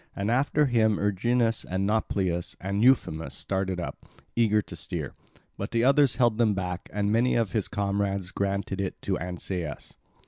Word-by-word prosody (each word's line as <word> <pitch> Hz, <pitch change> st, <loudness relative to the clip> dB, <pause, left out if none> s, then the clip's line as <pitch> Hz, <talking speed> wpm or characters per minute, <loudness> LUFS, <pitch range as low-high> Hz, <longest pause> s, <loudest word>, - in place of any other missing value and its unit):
And 100 Hz, +3 st, -1 dB
after 145 Hz, +4 st, +3 dB
him 110 Hz, -5 st, +3 dB
Erginus 115 Hz, +3 st, +1 dB
and 95 Hz, +2 st, -2 dB
Nauplius 95 Hz, -5 st, -1 dB
and 100 Hz, +3 st, -1 dB
Euphemus 80 Hz, -, +2 dB
started 95 Hz, +1 st, -2 dB
up, 85 Hz, -, -6 dB, 0.3 s
eager 110 Hz, -2 st, +3 dB
to -, -, -9 dB
steer. -, -, -5 dB, 0.5 s
But -, -, -3 dB
the 115 Hz, 0 st, +1 dB
others 135 Hz, -1 st, +4 dB
held 120 Hz, -3 st, +2 dB
them 110 Hz, -4 st, +3 dB
back, 90 Hz, -1 st, -4 dB
and 105 Hz, 0 st, 0 dB
many 120 Hz, +3 st, +3 dB
of 115 Hz, -4 st, +1 dB
his 110 Hz, -4 st, 0 dB
comrades 100 Hz, -2 st, -1 dB
granted 100 Hz, 0 st, -2 dB
it 95 Hz, -, -4 dB
to 95 Hz, -2 st, -1 dB
Ancaeus. 90 Hz, -2 st, -5 dB
100 Hz, 165 wpm, -27 LUFS, 95-115 Hz, 0.5 s, others